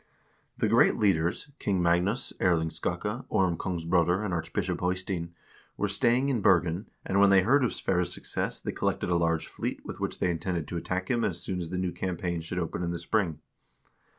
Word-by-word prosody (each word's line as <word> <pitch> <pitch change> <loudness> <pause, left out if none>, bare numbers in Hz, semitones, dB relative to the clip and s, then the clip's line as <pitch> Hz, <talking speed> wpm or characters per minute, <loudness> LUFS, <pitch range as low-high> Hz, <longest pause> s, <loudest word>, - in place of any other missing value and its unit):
The - - +1
great - - +5
leaders 90 - +1
— - - -43
King 100 -3 0
Magnus, 90 +8 +1
Erling 80 -3 +2
Skakke, 105 +9 -3
Orm 95 -5 +2
Kongsbroder, 90 +2 +1
and 95 - -2
Archbishop 85 -2 -2
Eystein 90 -2 -2 0.2
— - - -28
were 105 - 0
staying 120 +6 +2
in 125 -6 0
Bergen, 90 0 +3 0.2
and 95 - +1
when 100 0 +7
they 95 -1 +6
heard 135 +7 +4
of 125 - +1
Sverre's 90 -2 0
success - - -2
they - - -4
collected - - -1
a - - +3
large 85 -1 +1
fleet - - -5
with - - -7
which - - -2
they 90 - +1
intended 85 -2 -2
to 85 - -3
attack 95 +4 -2
him 120 -2 +1
as 85 -2 -1
soon 90 +1 -3
as 85 -2 -4
the 90 - -3
new 90 -1 -1
campaign 90 -2 -3
should 80 +3 -6
open 85 0 -2
in 85 - -1
the 85 - -2
spring. 85 -3 -1
90 Hz, 205 wpm, -28 LUFS, 85-100 Hz, 0.2 s, when